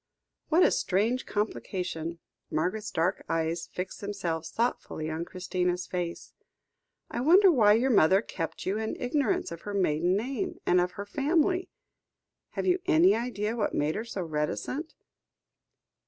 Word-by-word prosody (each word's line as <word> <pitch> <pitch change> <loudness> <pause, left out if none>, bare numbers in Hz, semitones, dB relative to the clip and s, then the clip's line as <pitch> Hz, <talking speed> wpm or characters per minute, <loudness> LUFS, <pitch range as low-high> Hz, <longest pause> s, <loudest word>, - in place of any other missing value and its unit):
"What 340 +3 +5
a - - +5
strange 220 +7 0
complication," 180 -5 -3 0.3
Margaret's 185 +7 -1
dark 180 +1 0
eyes 165 +1 -1
fixed 180 +1 -6
themselves 175 -6 -3
thoughtfully 190 -9 -2
on 160 +2 -3
Christina's 180 0 -2
face. 175 -2 -4 0.8
"I - - -2
wonder 365 +7 +7
why 215 -8 +5
your 250 +5 +2
mother 190 0 +5
kept 165 -7 -5
you 195 +3 0
in 220 0 -2
ignorance 250 - 0
of 170 - -7
her 205 -1 -5
maiden 180 0 +2
name, 245 +2 -3
and 180 0 +4
of 180 0 -1
her 200 - -6
family? 320 - +1 0.8
Have - - -2
you 365 0 +3
any 345 +2 +6
idea 230 -2 -2
what 220 -3 -1
made 150 +2 +1
her 215 - -3
so 215 -5 -4
reticent? 160 - -3
200 Hz, 145 wpm, -28 LUFS, 175-245 Hz, 0.8 s, wonder